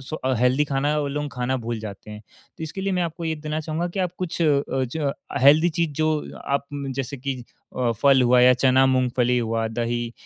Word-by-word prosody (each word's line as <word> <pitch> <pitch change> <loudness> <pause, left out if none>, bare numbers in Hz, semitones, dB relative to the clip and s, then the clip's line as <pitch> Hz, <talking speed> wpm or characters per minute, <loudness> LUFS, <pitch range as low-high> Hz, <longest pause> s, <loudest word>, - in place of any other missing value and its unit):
सु 145 +4 -6
स्व 130 0 0
हेल्थी 125 +4 +3
खाना 145 +1 0
वो 145 - -1
लोग 145 +1 -3
खाना 125 +1 -1
भूल 115 0 -4
जाते 105 -1 -9
हैं। 105 - -8 0.4
तो - - -8
इसके 160 +5 -6
लिए 195 0 -1
मैं 180 - +1
आपको 170 0 -4
ये 160 0 -1
देना 150 0 -4
चाहूँगा 160 +3 -3
कि, 185 +3 -7
आप 180 -2 0
कुछ 180 -2 -4
अ 145 -3 +3
ज 135 +2 -1 0.3
हेल्थी 155 +5 +6
चीज़ 170 -1 -1
जो 155 -1 -1
आप 140 0 -1 0.3
जैसे 135 +1 -3
कि 135 +1 -3 0.4
अ, 125 -2 +1
फल 135 -2 +6
हुआ 125 0 +5
या 125 +1 +7
चना, 130 +1 +4
मूंगफली 125 -1 +2
हुआ, 115 -1 -1
दही 120 +1 -2
135 Hz, 215 wpm, -23 LUFS, 125-155 Hz, 0.4 s, या